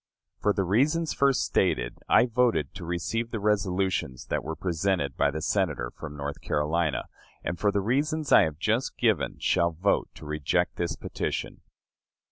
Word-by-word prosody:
For 105 Hz, -, +2 dB
the 100 Hz, -, 0 dB
reasons 145 Hz, -, +2 dB
first 140 Hz, -1 st, +3 dB
stated, -, -, 0 dB
I -, -, +6 dB
voted 115 Hz, -, +1 dB
to 95 Hz, -3 st, -8 dB
receive 90 Hz, +7 st, -2 dB
the 115 Hz, -, -3 dB
resolutions 95 Hz, -, 0 dB
that -, -, 0 dB
were 80 Hz, +2 st, -4 dB
presented 85 Hz, -4 st, -1 dB
by -, -, +2 dB
the 80 Hz, +2 st, -4 dB
Senator 80 Hz, -12 st, 0 dB
from 75 Hz, -2 st, -8 dB
North 70 Hz, 0 st, -5 dB
Carolina, 80 Hz, +1 st, 0 dB, 0.4 s
and 90 Hz, -, -3 dB
for 105 Hz, -, +2 dB
the 100 Hz, -, 0 dB
reasons 145 Hz, -, 0 dB
I -, -, +9 dB
have 80 Hz, -2 st, -4 dB
just 110 Hz, +9 st, 0 dB
given 110 Hz, -, +1 dB
shall 85 Hz, -, +2 dB
vote 95 Hz, +5 st, +1 dB
to -, -, -11 dB
reject 75 Hz, -1 st, 0 dB
this 85 Hz, -1 st, -1 dB
petition. -, -, -4 dB
90 Hz, 165 wpm, -27 LUFS, 80-110 Hz, 0.4 s, I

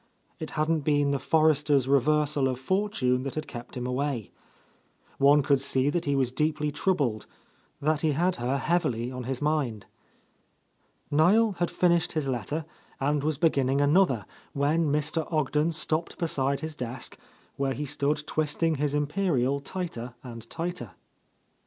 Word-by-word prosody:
It -, -, -5 dB
hadn't 155 Hz, +1 st, +2 dB
been 145 Hz, -1 st, +1 dB
the 140 Hz, -, 0 dB
Forresters' 150 Hz, -4 st, +3 dB
reversal 145 Hz, +1 st, +2 dB
of 130 Hz, -1 st, -2 dB
fortune 130 Hz, -6 st, 0 dB
that 135 Hz, 0 st, -5 dB
had 155 Hz, -1 st, -3 dB
kept 120 Hz, 0 st, -8 dB
him 125 Hz, -, -3 dB
away. 125 Hz, -3 st, -2 dB, 0.9 s
One 140 Hz, +1 st, +5 dB
could 140 Hz, -1 st, +2 dB
see 135 Hz, 0 st, +2 dB
that 170 Hz, +2 st, -1 dB
he 140 Hz, -1 st, +1 dB
was 130 Hz, -3 st, +1 dB
deeply 150 Hz, +2 st, 0 dB
troubled, 145 Hz, -, 0 dB, 0.5 s
that 150 Hz, +1 st, +1 dB
he 155 Hz, -2 st, +2 dB
had 175 Hz, +5 st, +1 dB
her 125 Hz, +3 st, -1 dB
heavily 130 Hz, -6 st, 0 dB
on 125 Hz, -1 st, -6 dB
his 130 Hz, +2 st, -3 dB
mind. 145 Hz, -9 st, -1 dB, 1.3 s
Niel 195 Hz, +10 st, +4 dB
had 175 Hz, -, +1 dB
finished 170 Hz, -1 st, +2 dB
his 155 Hz, -4 st, -1 dB
letter 135 Hz, +5 st, -2 dB, 0.3 s
and 145 Hz, +1 st, 0 dB
was 155 Hz, -1 st, 0 dB
beginning 140 Hz, -4 st, +2 dB
another, 145 Hz, -, +3 dB, 0.3 s
when 150 Hz, +2 st, +1 dB
Mr. 150 Hz, +2 st, -1 dB
Ogden 150 Hz, 0 st, +1 dB
stopped 160 Hz, 0 st, -1 dB
beside 140 Hz, -4 st, 0 dB
his 160 Hz, 0 st, -4 dB
desk, 125 Hz, -3 st, -5 dB, 0.4 s
where 135 Hz, -1 st, -1 dB
he 150 Hz, -, -4 dB
stood 145 Hz, +1 st, -1 dB
twisting 155 Hz, +1 st, 0 dB
his 145 Hz, +1 st, 0 dB
imperial 145 Hz, -3 st, +1 dB
tighter 140 Hz, -7 st, -5 dB
and 115 Hz, -2 st, -9 dB
tighter. 165 Hz, -, -5 dB
145 Hz, 150 wpm, -27 LUFS, 130-155 Hz, 1.3 s, One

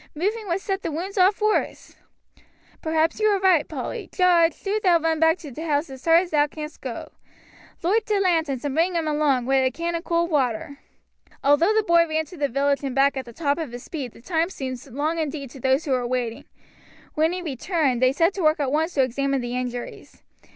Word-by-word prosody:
Moving 415 Hz, +7 st, -2 dB
would 345 Hz, +1 st, 0 dB
set 390 Hz, 0 st, -2 dB
the 335 Hz, -, -3 dB
wounds 360 Hz, +6 st, -4 dB
off 380 Hz, +3 st, +4 dB
worse." 425 Hz, 0 st, -1 dB, 0.9 s
"Perhaps 320 Hz, +3 st, 0 dB
you 430 Hz, -, +3 dB
are 405 Hz, -2 st, +2 dB
right, 370 Hz, -6 st, +3 dB
Polly. -, -, -5 dB
Jarge, 345 Hz, -3 st, +3 dB
do 415 Hz, +2 st, 0 dB
thou 360 Hz, -4 st, +5 dB
run 325 Hz, -1 st, 0 dB
back 320 Hz, +2 st, +4 dB
to 310 Hz, -5 st, -10 dB
t' 280 Hz, -, -8 dB
house 300 Hz, -2 st, -1 dB
as 265 Hz, -1 st, -10 dB
hard 330 Hz, +1 st, +5 dB
as 360 Hz, -, -7 dB
thou 295 Hz, -1 st, +3 dB
canst 300 Hz, +1 st, -8 dB
go. -, -, -6 dB, 0.7 s
Loight 415 Hz, +6 st, +1 dB
t' 420 Hz, -2 st, +1 dB
lanterns 320 Hz, -8 st, 0 dB
and 285 Hz, -, -1 dB
bring 340 Hz, +4 st, +1 dB
'em 325 Hz, -2 st, -1 dB
along, 295 Hz, -5 st, +1 dB
wi' 270 Hz, +1 st, +2 dB
a 260 Hz, -, +3 dB
can 335 Hz, +4 st, -3 dB
o' 335 Hz, -, -2 dB
cold 340 Hz, 0 st, 0 dB
water." 275 Hz, -1 st, -1 dB, 0.6 s
Although 315 Hz, +9 st, +4 dB
the 440 Hz, -, +3 dB
boy 340 Hz, -3 st, +4 dB
ran 315 Hz, 0 st, -1 dB
to 360 Hz, -, -13 dB
the 285 Hz, -2 st, 0 dB
village 280 Hz, +3 st, 0 dB
and 265 Hz, -2 st, -3 dB
back 275 Hz, +1 st, +3 dB
at 265 Hz, -1 st, -4 dB
the 235 Hz, -, -11 dB
top 285 Hz, +2 st, -1 dB
of 310 Hz, -7 st, -4 dB
his 245 Hz, -, -7 dB
speed 270 Hz, -8 st, -6 dB
the -, -, -16 dB
time 330 Hz, +1 st, 0 dB
seemed 260 Hz, -8 st, -6 dB
long 295 Hz, +6 st, -2 dB
indeed 290 Hz, -4 st, -4 dB
to 270 Hz, -, -11 dB
those 265 Hz, +4 st, +1 dB
who 285 Hz, -, -2 dB
were 250 Hz, -2 st, +1 dB
waiting. 240 Hz, -2 st, -3 dB, 0.7 s
When 315 Hz, +2 st, +2 dB
he 360 Hz, 0 st, -4 dB
returned 280 Hz, -3 st, -1 dB
they 255 Hz, 0 st, +5 dB
set 335 Hz, +7 st, +2 dB
to 395 Hz, -, -4 dB
work 310 Hz, -1 st, +3 dB
at 275 Hz, -3 st, 0 dB
once 320 Hz, +4 st, 0 dB
to 270 Hz, -, +4 dB
examine 275 Hz, +2 st, -1 dB
the 240 Hz, 0 st, -4 dB
injuries. 245 Hz, -1 st, -6 dB
310 Hz, 225 wpm, -24 LUFS, 270-340 Hz, 0.9 s, thou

